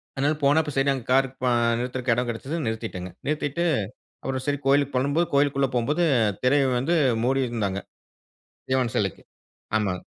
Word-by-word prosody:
அதனால 140 +3 +1
போனா 145 +3 +5
அப்போ 150 -2 -5
சரி, 135 +1 +2
அங்க 130 -4 -5
கார் 135 +1 +4 0.2
பா 125 - +3 0.3
நிறுத்துறக்கு 125 +1 -2
எடம் 125 +1 -1
கெடைச்சது 130 +7 -4
நிறுத்திட்டேங்க. 110 -5 -4 0.2
நிறுத்திட்டு 150 +2 -1 0.6
அப்புறம் 130 -1 -3
சரி 145 0 0
கோயிலுக்கு 140 0 +3
போலான்னும் 140 +3 0
போது 170 - +3
கோயிலுக்குள்ள 140 -1 +3
போம்போது 145 +8 +1 0.4
திரைய 140 +2 +4
வந்து 155 +8 +1 0.3
மூடி 135 +2 +2
இருந்தாங்க. 100 -5 -2 0.9
சிவன் 130 -3 +1
சிலைக்கு. 100 -4 -1 0.5
ஆமாங்க. 95 -4 -1
130 Hz, 155 wpm, -25 LUFS, 120-145 Hz, 0.9 s, போனா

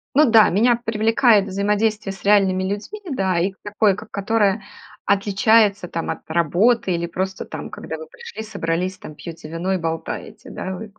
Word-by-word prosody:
Ну 305 - +6
да, 220 -1 +7
меня 235 +6 +3
привлекает 225 -1 +3
взаимодействие 205 +1 0
с 190 - -15
реальными 195 -2 +3
людьми, 205 - -4
да, 190 -9 0
и 190 +3 +1
к 190 - -26
такое, 205 -1 +2
к 215 +2 -10
которое 205 0 +1 0.4
отличается 200 0 +3
там 165 0 -3
от - - -5
работы 185 +6 +2
или 170 0 -2
просто 190 +2 -4
там, - - -7
когда - - -6
вы 475 - -9
пришли, 465 - -9
собрались 185 -3 -2
там, 155 - -10
пьете 165 -2 -9
вино 175 +4 -2
и - - +1
болтаете, 165 -1 -5
да. 190 0 -5
Вык 210 +2 -10
200 Hz, 175 wpm, -21 LUFS, 185-220 Hz, 0.4 s, да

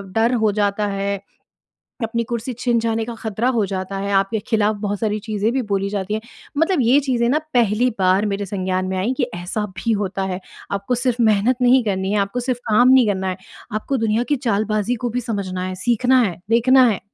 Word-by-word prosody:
डर 230 +2 +3
हो 215 - +4
जाता 205 0 0
है, 200 0 -2 0.9
अपनी 230 +1 -1
कुर्सी 235 +2 -3
छिन 240 -2 +2
जाने 225 0 -1
का 235 - -5
खतरा 220 +2 -2
हो 220 - +2
जाता 190 0 -4
है, 200 +1 -3
आपके 195 +3 +2
खिलाफ 215 -1 +2
बहुत 205 -1 -2
सारी 215 -1 0
चीज़ें 215 +1 -1
भी 265 0 0
बोली 195 0 0
जाती 200 0 -2
हैं 220 - -2 0.4
मतलब 325 +1 +2
ये 245 +4 +5
चीज़ें 250 -4 0
ना 295 - +3 0.2
पहली 235 0 +3
बार 190 +3 +3
मेरे 200 0 -3
संज्ञान 185 -1 -2
में 190 - -2
आई 220 +7 0
कि 255 - +3
ऐसा 180 +5 -3
भी 230 +3 0
होता 195 0 -3
है, 180 - -4 0.3
आपको 200 +5 -1
सिर्फ 245 0 -1
मेहनत 220 +2 +3
नहीं 250 +1 +5
करनी 190 -1 -1
है, 210 - +2
आपको 240 +5 -4
सिर्फ 250 0 -2
काम 245 +4 +5
नहीं 260 -2 +6
करना 190 -2 -1
है, 185 - -2 0.4
आपको 215 +6 -1
दुनिया 225 +1 +1
की 290 - +3
चालबाज़ी 215 +2 0
को - - -1
भी 250 +2 -1
समझना 195 -5 -3
है, 185 - -4
सीखना 250 +2 +4
है, 180 -7 -1
देखना 255 +3 +5
है। 195 - -4
215 Hz, 215 wpm, -20 LUFS, 200-240 Hz, 0.9 s, नहीं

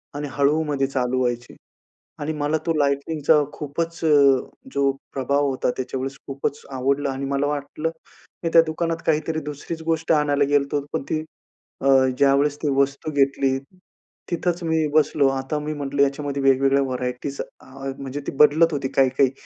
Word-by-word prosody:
आणि 145 0 -3
हळूमध्ये 145 -1 +1
चालू 130 -1 -1
व्हायची. 120 -1 -2 0.6
आणि 150 +2 -2
मला 145 +2 +1
तो 165 - +1
लाइटिंगचा 145 +1 +2
खूपच 165 +3 -4
अ, - - +3 0.6
जो 140 -1 +2 0.2
प्रभाव 140 +2 +1
होता, 130 -1 -1
त्याच्यावेळेस 130 +1 -4
खूपच 140 +1 -3
आवडला 135 +2 0
आणि 135 +1 -4
मला 140 +1 0
वाटलं 145 +2 -3 0.5
मी 165 - +1
त्या 165 - +9
दुकानात 165 +1 -1
काहीतरी 155 0 +1
दुसरीच 150 +3 -6
गोष्ट 165 0 0
आणायला 145 -2 +2
गेलो 145 -1 +4
होतो, 145 -1 -1
पण - - 0
ती 155 0 -1 0.6
अ, - - -4 0.3
ज्यावेळेस 140 +1 +3
ती 150 - +1
वस्तू 140 +3 0
घेतली, 135 -2 +2 0.7
तिथंच 175 +1 -1
मी 160 -1 +1
बसलो. 150 -2 +3
आता 135 +2 -2
मी 150 +1 -4
म्हंटलं 140 -1 -2
याच्यामध्ये 140 0 -1
वेगवेगळ्या 135 +1 +4
व्हरायटीज 125 +1 -4 0.2
आ 135 +1 -8
म्हणजे 140 +1 -5
ती - - -1
बदलत 155 +3 +5
होती, 140 -2 -1
काही-काही. 135 0 +4
140 Hz, 155 wpm, -23 LUFS, 135-150 Hz, 0.7 s, त्या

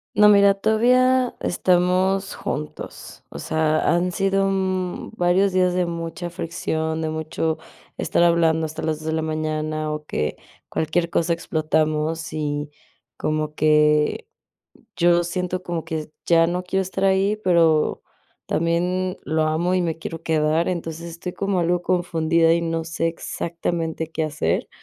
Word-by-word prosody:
No, 210 +1 +7
mira, 200 -1 +6
todavía 250 +5 +3
estamos 185 +2 +1
juntos, 150 0 -6
o - - -8
sea, 155 0 +1 0.2
han 180 +1 0
sido, 195 +1 +1
mm, 185 -2 -2
varios 185 +1 +2
días 185 -1 +3
de 180 0 +1
mucha 170 0 -5
fricción, 160 -2 -3
de 160 - -1
mucho 160 0 -2 0.4
estar - - 0
hablando 165 -2 +3
hasta 155 0 -6
las 155 -1 -1
2 155 - -11
de 160 - 0
la 160 - 0
mañana, 155 0 -2
o 150 0 -5
que 75 - -2 0.3
cualquier 170 +2 -1
cosa, 170 0 0
explotamos, 155 -1 -1
y 145 -1 -2 0.5
como 155 0 -2
que 150 - +3 0.7
yo 175 0 +3
siento 180 +1 -3
como 170 -2 -3
que 155 -1 -4 0.2
ya 165 -1 +4
no 175 +2 -2
quiero 190 +1 -1
estar 190 +1 -3
ahí, 195 +2 +3
pero 165 -4 +3 0.4
también 180 +2 0
lo 160 0 0
amo 160 +4 +1
y 185 - +2
me 165 -2 -2
quiero 165 0 -6
quedar. 160 +1 +1
Entonces, 170 -1 -4
estoy 170 +2 -6
como 195 0 -1
algo 175 0 +1
confundida 170 -2 +2
y 170 - +1
no 165 -1 -2
sé 165 0 -1
exactamente 165 -1 -3
qué 160 0 -3
hacer, 150 - -1
170 Hz, 145 wpm, -22 LUFS, 160-180 Hz, 0.7 s, No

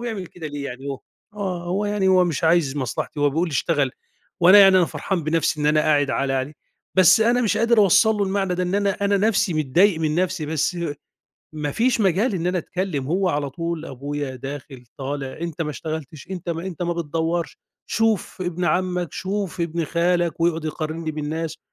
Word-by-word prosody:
بيعمل 220 -6 -4
كده 165 -2 -9
ليه 145 -1 -5
يعني 130 +2 -7
هو 135 -1 -5 0.3
آه، 185 -4 -3
هو 190 +4 -1
يعني 205 -2 +1
هو 185 -1 +5
مش 165 -2 -2
عايز 160 -4 +3
مصلحتي، 140 +3 -3
هو 145 -1 +3
بيقول 165 +4 0
لي - - -8
اشتغل 145 -2 +1 0.5
وأنا 185 +4 +8
يعني 195 -1 +8
أنا 180 - +5
فرحان 165 +2 -3
بنَفْسي 155 -1 0
إن 150 - +1
أنا 150 0 +4
قاعد 145 -2 +2
عالة 135 -1 0
عليه، 135 +3 -2 0.4
بس 190 +3 +6
أنا 240 +2 +3
مش 220 - +1
قادر 230 0 +3
أوصّل 200 +2 +5
له 205 - 0
المعنى 190 -1 -1
ده، 180 - -1
إن 180 +2 -1
أنا 200 -1 +2
أنا 200 0 +3
نَفْسي 210 -3 +2
متضايق 160 +5 +3
من 155 -1 0
نَفْسي، 180 -3 -1
بس 160 +3 -1 0.8
ما 150 -2 -3
فيش 235 - +1
مجال 200 +3 +2
إن 175 -1 -2
أنا 180 0 +1
أتكلِّم، 175 -7 -3
هو 185 +4 +1
على 145 -3 -1
طول 165 +2 -4
أبويا 140 0 -5
داخِل 135 -1 -8
طالع 135 0 -5
"أنت 170 -1 -3
ما 150 - -3
اشتغلتش، 155 0 -6
أنت 180 -2 -6
ما 165 +2 -4
أنت 180 -2 -5
ما 175 0 0
بتدوّرش، 165 +1 -2 0.3
شوف 225 -4 0
ابن 175 0 -2
عمَّك، 180 0 0
شوف 195 -2 -3
ابن 170 0 -1
خالك." 170 +1 0
ويقعُد 165 -1 +1
يقارنّي 155 +1 -3
بالناس 155 +1 -4
170 Hz, 195 wpm, -22 LUFS, 150-190 Hz, 0.8 s, وأنا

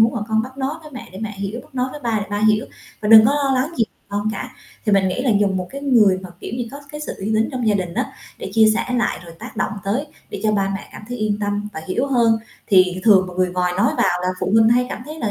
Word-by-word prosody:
huống 225 +1 +5
mà 235 - -3
con 220 0 +2
bác 260 +3 -9
nói 270 +2 -1
với 305 - -11
mẹ 255 - -8
để 190 - -8
mẹ 215 -1 -3
hiểu, 200 +4 -4
bác - - -23
nói 255 0 0
với 295 - -8
ba 230 -4 0
để 205 - -4
ba 205 0 -1
hiểu 215 0 +3 0.3
và 210 - -2
đừng 220 0 +10
có 280 - +3
lo 285 -2 +1
lắng 290 +6 -2
gì 230 - +3 0.2
con 205 +1 -1
cả. 200 - -5 0.4
Thì 210 - +3
mình 195 -1 +4
nghĩ 220 +7 -2
là 260 - +2
dùng 195 -2 +2
một 180 -1 -3
cái 275 - -6
người 225 -9 +4
mà, 185 - -8
kiểu - - -7
như, 240 -2 -3
có 280 +2 -9
cái 300 - -6
sự 300 - -5
uy 205 +3 -2
tín 220 +1 +2
trong 250 -3 -2
gia 210 - +3
đình 180 -3 -2
á - - -2 0.3
để - - -6
chia 220 -1 +6
sẻ 230 - 0
lại, 240 -2 0
rồi 170 -1 -11
tác - - -10
động - - -1
tới 235 +9 -1 0.2
để - - -5
cho 215 -1 +2
ba 195 -2 +1
mẹ 195 - -7
cảm - - -10
thấy 245 - -4
yên 215 -1 0
tâm 205 0 -2
và 160 - -6
hiểu 240 +9 0
hơn, 235 -4 +3 0.3
thì 185 -1 +4
thường 195 -4 +6
mà 180 - -9
người 185 0 +1
ngoài 180 0 0
nói 200 - +3
vào 180 0 +2
là 180 - 0
phụ - - -1
huynh 225 0 +6
hay 245 +2 +3
cảm 245 - -6
thấy 305 +3 -8
là 225 -8 -1
215 Hz, 305 wpm, -20 LUFS, 195-245 Hz, 0.4 s, đừng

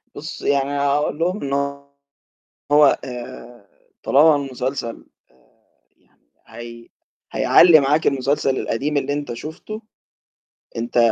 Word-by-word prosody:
بُصّي - - -5
يعني 140 -1 +1
هاقول 145 +2 0
لهم 180 +5 -1
إنه 140 0 -3 0.9
هو 145 -1 +5
آآ 120 -3 -10 0.3
طالما 150 +2 +5
المسلسل، 130 -3 -4 0.2
آآ - - -30 0.6
يعني - - -36 0.3
هي 115 0 -11 0.4
هيعلّي 165 -2 +6
معاك 145 +3 +1
المسلسل 135 0 0
القديم 145 +6 -2
اللي 140 0 -1
أنت 145 -3 -4
شُفته، 170 - -8 1.0
أنت 120 +1 -3
140 Hz, 110 wpm, -20 LUFS, 125-150 Hz, 1.0 s, هيعلّي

